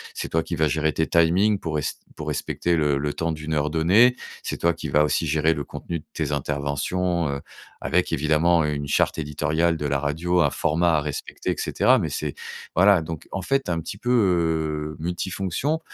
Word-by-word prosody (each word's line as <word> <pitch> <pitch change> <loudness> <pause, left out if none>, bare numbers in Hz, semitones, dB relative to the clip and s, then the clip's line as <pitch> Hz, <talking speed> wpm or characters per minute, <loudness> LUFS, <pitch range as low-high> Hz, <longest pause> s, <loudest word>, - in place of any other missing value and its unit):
c'est - - -4
toi 80 - +1
qui - - -4
vas 80 - +2
gérer 80 +1 +1
tes 80 - 0
timings 90 +5 +3
pour 80 -4 -4
res 75 - -1 0.3
pour - - -7
respecter 85 0 -1
le 75 -3 +2
le 75 +1 -2
temps 85 0 -1
d'une 80 0 -4
heure 75 0 +1
donnée. 95 +11 +4 0.3
C'est - - -3
toi 85 0 +2
qui 80 -2 -6
vas 75 +2 +4
aussi 75 +2 +1
gérer 80 +2 +2
le 75 - -4
contenu 85 +4 -6
de - - -16
tes 75 -2 -2
interventions, 75 +4 -1
heu, 70 0 -2 0.4
avec - - 0
évidemment, 80 +2 +3
heu, 75 0 0
une 70 0 -4
charte - - +1
éditoriale 80 +3 0
de 75 - -4
la 70 -1 0
radio, 80 +5 0
un - - +4
format 80 +1 +1
à - - 0
respecter 75 -2 -4
et - - -2
cetera 130 +1 +3
mais 85 -6 -2
c'est 75 0 -3 0.4
voilà, 95 0 +5
donc 80 0 -7
en 95 - -3
fait, 135 0 +1
tu 90 - -2
es - - +2
un 85 - -1
petit 80 - -7
peu, 120 - -4
heu, 80 -8 +1
multifonctions. 95 - -2
80 Hz, 215 wpm, -24 LUFS, 75-85 Hz, 0.4 s, voilà